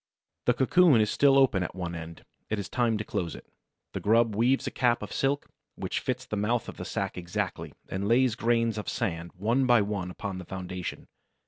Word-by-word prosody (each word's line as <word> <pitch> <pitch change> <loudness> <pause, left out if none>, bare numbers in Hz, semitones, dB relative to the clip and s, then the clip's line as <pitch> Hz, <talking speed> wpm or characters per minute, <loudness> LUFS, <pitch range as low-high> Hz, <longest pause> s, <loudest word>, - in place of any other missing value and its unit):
The 125 - +3
cocoon 145 +1 +5
is 105 0 +2
still 140 -1 +5
open 130 -8 +4
at 90 - -4
one 90 -2 -4
end. 80 0 -8 0.2
It 110 - 0
is 100 - -4
time 120 -3 +1
to 105 - -3
close 85 -4 -3
it. - - -12 0.5
The - - -3
grub 115 0 +3
weaves 125 +5 +2
a - - -2
cap 120 -3 +1
of 105 - -7
silk 140 0 0 0.3
which - - -3
fits 130 0 -3
the 105 - -4
mouth 110 +3 0
of - - -8
the - - -6
sack 95 -2 -3
exactly, 85 0 -4
and 95 +1 -3
lays 120 +1 +4
grains 115 -1 +1
of 105 - -4
sand 85 -1 -2
one 120 +7 +1
by 120 -4 +5
one 100 -3 -3
upon 95 +1 -5
this 90 - -9
foundation. 90 -1 -6
110 Hz, 210 wpm, -28 LUFS, 95-125 Hz, 0.5 s, cocoon